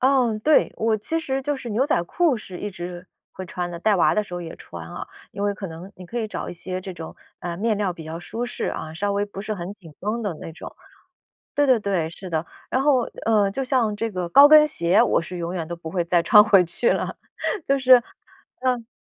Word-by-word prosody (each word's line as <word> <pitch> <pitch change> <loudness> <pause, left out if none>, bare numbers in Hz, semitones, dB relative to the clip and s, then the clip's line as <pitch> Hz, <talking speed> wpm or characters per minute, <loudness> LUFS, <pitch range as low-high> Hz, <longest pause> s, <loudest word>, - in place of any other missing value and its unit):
哦， 255 -4 +3
对。 310 - +4
我 220 0 +1
其 325 +10 -2
实 270 -4 -2
就 290 0 -1
是 240 -3 -7
牛 240 +6 +2
仔 170 - +2
裤 315 - +1
是 185 -4 -9
一 205 - -4
直 175 0 -7 0.3
会 185 - -7
穿 175 -1 -4
的。 170 - -6
带 205 +2 +2
娃 - - +4
的 215 - +2
时 180 -4 -9
候 175 - -4
也 165 -1 -7
穿 85 -1 -10
啊。 - - -7 0.3
因 200 - -5
为 205 0 +1
可 195 - -6
能 170 +3 -9
你 180 - -10
可 240 +6 -4
以 220 - -1
找 - - -5
一 - - -5
些 185 +1 -5
这 190 0 -7
种， 165 -2 -9 0.3
呃， 170 -1 -4
面 215 +1 0
料 195 -4 0
比 165 -2 -10
较 160 +1 -6
舒 220 +8 -5
适 245 - -4
啊， 155 0 -4
稍 200 +4 -1
微 200 +1 0
不 200 -1 -8
是 215 +1 -3
很 180 +1 -6
紧 175 -7 -15
绷 215 +4 -2
的 200 -6 -2
那 165 - -7
种。 175 - -10 0.8
对 290 - +3
对 255 -4 +5
对， 185 -6 -1
是 185 +2 -9
的。 160 0 -1 0.3
然 260 - +1
后， 270 -4 +4 0.2
呃， 210 -3 +3
就 270 +7 -3
像 250 -5 +1
这 230 +1 -2
个 180 -3 -3
高 280 +11 +8
跟 305 0 +8
鞋， 170 - +3
我 - - +2
是 180 +1 -7
永 170 +1 -3
远 165 -2 -4
都 170 - -5
不 165 -1 -8
会 175 -3 0
再 170 0 +2
穿 210 +5 +8
回 200 -4 +5
去 175 +8 +1
了。 - - -2 0.5
就 275 0 +2
是， 255 -2 +7 0.6
嗯。 250 -3 0
200 Hz, 265 characters per minute, -23 LUFS, 175-235 Hz, 0.8 s, 高